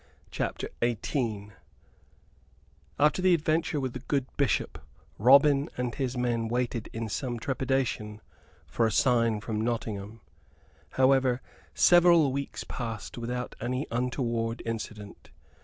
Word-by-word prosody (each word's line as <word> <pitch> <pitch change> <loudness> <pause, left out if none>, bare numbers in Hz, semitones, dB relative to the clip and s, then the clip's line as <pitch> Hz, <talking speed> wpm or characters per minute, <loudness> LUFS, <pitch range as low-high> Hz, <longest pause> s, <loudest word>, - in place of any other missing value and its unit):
CHAPTER - - -3
XVIII 115 -3 -2 1.5
After 150 +5 +3
the 185 -1 +5
adventure 160 -1 0
with 130 -3 -3
the 130 - -5
good 135 +1 -1
Bishop, 140 -2 0 0.4
Robin 140 +5 +5
and 125 -1 -2
his 130 -3 -3
men 120 -2 0
waited 120 -1 -2
in 115 0 -4
some 120 +2 -3
trepidation 130 -5 -1 0.5
for 115 - +1
a - - -1
sign 115 -2 +2
from 110 0 -3
Nottingham. 110 -2 -3 0.7
However, 130 -1 +3 0.4
several 175 -5 +6
weeks 140 +1 -4
passed 115 -1 -6
without 125 +1 -4
any 125 +4 -2
untoward 120 -1 -1
incident. 110 -2 -6
125 Hz, 115 wpm, -28 LUFS, 115-135 Hz, 1.5 s, several